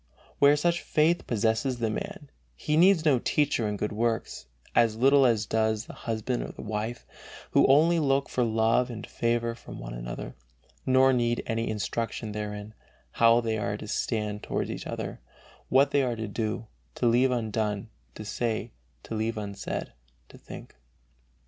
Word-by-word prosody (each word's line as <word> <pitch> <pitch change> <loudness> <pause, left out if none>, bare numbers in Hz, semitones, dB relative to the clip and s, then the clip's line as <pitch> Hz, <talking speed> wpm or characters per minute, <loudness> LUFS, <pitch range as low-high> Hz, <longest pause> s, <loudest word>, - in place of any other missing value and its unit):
Where 145 +1 +6
such 170 +3 +1
faith 160 +2 +1
possesses 115 +3 0
the 115 -2 -1
man, 145 +6 -6 0.2
he 150 - -1
needs 175 0 +5
no 140 -5 +4
teacher 140 -4 +1
in 105 0 -2
good 105 - -2
works, 110 - -2 0.3
as 115 -2 +3
little 135 +3 +5
as 110 -2 +1
does 110 0 0
the - - -10
husband 115 +2 -3
or - - -5
the - - -10
wife, 110 +3 -4 0.5
who - - +5
only 160 +5 +5
look 140 -2 +1
for 125 - 0
love 115 +2 +2
and 115 -3 -6
favor 115 0 -1
from 115 - -11
one - - -7
another, - - -6 0.5
nor 130 0 +5
need 120 -1 +1
any 115 0 -1
instruction 110 +1 -3
therein 105 0 -5 0.4
"how 115 +1 +5
they 110 -2 -1
are 105 0 -2
to 105 - -8
stand 105 -1 -2
toward - - -2
each - - -6
other, - - -5 0.5
what 135 +2 +4
they 140 - +3
are 125 -3 0
to 110 -1 -4
do, 110 +1 -3 0.3
to - - -1
leave 120 +3 +4
undone, 110 -3 -2 0.3
to 110 - -8
say, 110 +1 -2 0.3
to - - -7
leave 110 +1 -1
unsaid, 100 -2 -5 0.4
to - - -14
think." - - -11
115 Hz, 170 wpm, -27 LUFS, 110-130 Hz, 0.5 s, Where